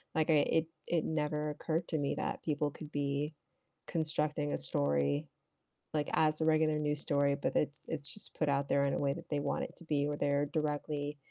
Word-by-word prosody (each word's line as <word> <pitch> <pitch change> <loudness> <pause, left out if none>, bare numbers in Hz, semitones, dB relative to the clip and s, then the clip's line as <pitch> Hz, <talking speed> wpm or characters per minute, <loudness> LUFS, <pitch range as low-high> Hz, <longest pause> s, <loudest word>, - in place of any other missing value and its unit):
Like, 160 0 +2
I - - +6
it 155 +2 +3 0.2
it 170 -2 +1
never 150 -1 0
occurred 165 +3 -2
to 160 - 0
me 140 - 0
that - - -2
people 150 -1 0
could 155 0 -10
be 145 +2 -1 0.5
constructing 150 -2 0
a - - +1
story, 70 0 +1 0.6
like, 150 -1 0
as 155 0 +3
a - - +3
regular 155 -1 +3
news 150 -1 +2
story, 140 -1 +2
but, 145 - -2
it's 145 0 -1
it's 145 -3 -2
just 210 - -6
put 155 - 0
out 140 0 +1
there 140 0 +3
in 140 -1 +1
a - - 0
way 140 -1 +2
that 170 0 -9
they 145 - 0
want - - -1
it - - -11
to - - -10
be, 145 -2 +1
or 145 - -1
they're 145 0 +2
directly 150 -1 -1
150 Hz, 210 wpm, -33 LUFS, 145-155 Hz, 0.6 s, I